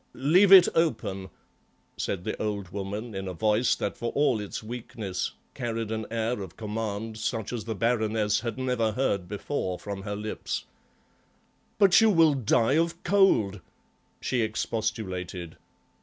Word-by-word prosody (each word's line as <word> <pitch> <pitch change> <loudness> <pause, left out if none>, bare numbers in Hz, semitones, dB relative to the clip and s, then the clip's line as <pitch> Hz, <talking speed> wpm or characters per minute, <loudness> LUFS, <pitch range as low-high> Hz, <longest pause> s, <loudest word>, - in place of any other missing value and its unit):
"Leave 180 +9 +4
it 190 -3 +10
open," 95 - 0 0.7
said 90 -3 -3
the 110 - -2
old 100 -3 -3
woman 100 +4 -5
in 95 0 -4
a 90 - -5
voice 110 +5 +2
that 100 - -3
for 120 -1 -3
all 140 -6 +2
its 105 +1 -5
weakness 115 -4 -4 0.2
carried 115 -3 -3
an 110 -1 -3
air 115 -1 -1
of 95 -4 -9
command 110 0 -4
such 110 0 -2
as 115 -3 -4
the 110 -1 -3
Baroness 110 -1 +1
had 115 +1 -4
never 125 -4 0
heard 100 -7 0
before 100 -1 -3
from 100 0 -6
her 105 +1 -4
lips. 105 +1 -4 1.1
"But 200 0 +6
you 225 - +6
will 165 -6 +5
die 125 +1 +2
of 170 +1 0
cold!" 120 - +3 0.6
she 125 -2 0
expostulated. 95 -6 -3
110 Hz, 145 wpm, -27 LUFS, 100-125 Hz, 1.1 s, it